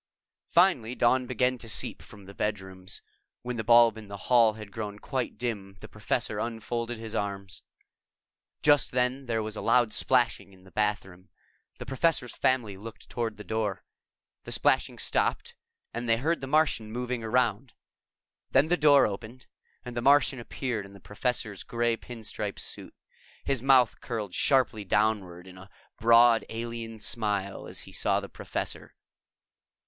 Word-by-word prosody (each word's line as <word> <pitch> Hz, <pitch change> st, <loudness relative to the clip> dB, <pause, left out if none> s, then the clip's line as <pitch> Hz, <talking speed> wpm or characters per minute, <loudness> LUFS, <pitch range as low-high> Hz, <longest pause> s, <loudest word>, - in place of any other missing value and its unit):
Finally 150 Hz, -10 st, +3 dB
dawn 125 Hz, +1 st, +2 dB
began 125 Hz, 0 st, +1 dB
to 115 Hz, -, -10 dB
seep -, -, -2 dB
from 100 Hz, -1 st, -14 dB
the 100 Hz, -, -11 dB
bedrooms. 95 Hz, -3 st, -4 dB, 0.4 s
When 125 Hz, -1 st, -4 dB
the 110 Hz, -, -2 dB
bulb 115 Hz, 0 st, +6 dB
in 105 Hz, -, -11 dB
the 100 Hz, 0 st, -7 dB
hall 115 Hz, +1 st, +4 dB
had 105 Hz, -2 st, -10 dB
grown 105 Hz, -2 st, -5 dB
quite 125 Hz, 0 st, -3 dB
dim, 105 Hz, -5 st, -4 dB
the -, -, -10 dB
Professor -, -, -2 dB
unfolded 115 Hz, +1 st, -3 dB
his 110 Hz, 0 st, -7 dB
arms. 100 Hz, -3 st, -4 dB, 1.0 s
Just 145 Hz, -2 st, +4 dB
then, 125 Hz, +1 st, 0 dB
there 115 Hz, -2 st, 0 dB
was 110 Hz, 0 st, -5 dB
a -, -, -5 dB
loud 115 Hz, -1 st, +3 dB
splashing 125 Hz, -6 st, +2 dB
in 95 Hz, -1 st, -19 dB
the 95 Hz, -, -17 dB
bathroom. 95 Hz, -3 st, -2 dB, 0.5 s
The -, -, -7 dB
Professor's 135 Hz, -1 st, 0 dB
family 115 Hz, -7 st, +1 dB
looked 110 Hz, +3 st, -11 dB
toward 115 Hz, -3 st, -2 dB
the 105 Hz, -, -8 dB
door. 110 Hz, -3 st, -2 dB, 0.6 s
The -, -, -8 dB
splashing -, -, +2 dB
stopped -, -, 0 dB, 0.4 s
and 120 Hz, 0 st, -4 dB
they 115 Hz, -, +4 dB
heard 160 Hz, +7 st, 0 dB
the 135 Hz, -, -5 dB
Martian 140 Hz, -7 st, +1 dB
moving 125 Hz, 0 st, -3 dB
around. 115 Hz, +1 st, 0 dB, 0.8 s
Then 140 Hz, +4 st, +3 dB
the 175 Hz, -, +3 dB
door 145 Hz, -3 st, +6 dB
opened 110 Hz, +5 st, -6 dB, 0.4 s
and 120 Hz, -1 st, -7 dB
the 120 Hz, -, -1 dB
Martian 135 Hz, 0 st, +4 dB
appeared 120 Hz, -2 st, -3 dB
in 100 Hz, 0 st, -13 dB
the 100 Hz, -, -13 dB
Professor's 105 Hz, 0 st, -3 dB
gray 120 Hz, 0 st, 0 dB
pin 115 Hz, 0 st, -10 dB
stripe -, -, -4 dB
suit. -, -, -5 dB, 0.5 s
His 135 Hz, -4 st, 0 dB
mouth 130 Hz, -2 st, +4 dB
curled 110 Hz, -6 st, -4 dB
sharply 130 Hz, -6 st, +2 dB
downward 95 Hz, -3 st, 0 dB
in 95 Hz, 0 st, -12 dB
a 95 Hz, +1 st, -13 dB, 0.3 s
broad 115 Hz, 0 st, +6 dB
alien 115 Hz, -1 st, -5 dB
smile 105 Hz, -3 st, -2 dB
as -, -, -5 dB
he -, -, -12 dB
saw -, -, +1 dB
the -, -, -8 dB
Professor. -, -, -5 dB
115 Hz, 160 wpm, -28 LUFS, 105-125 Hz, 1.0 s, bulb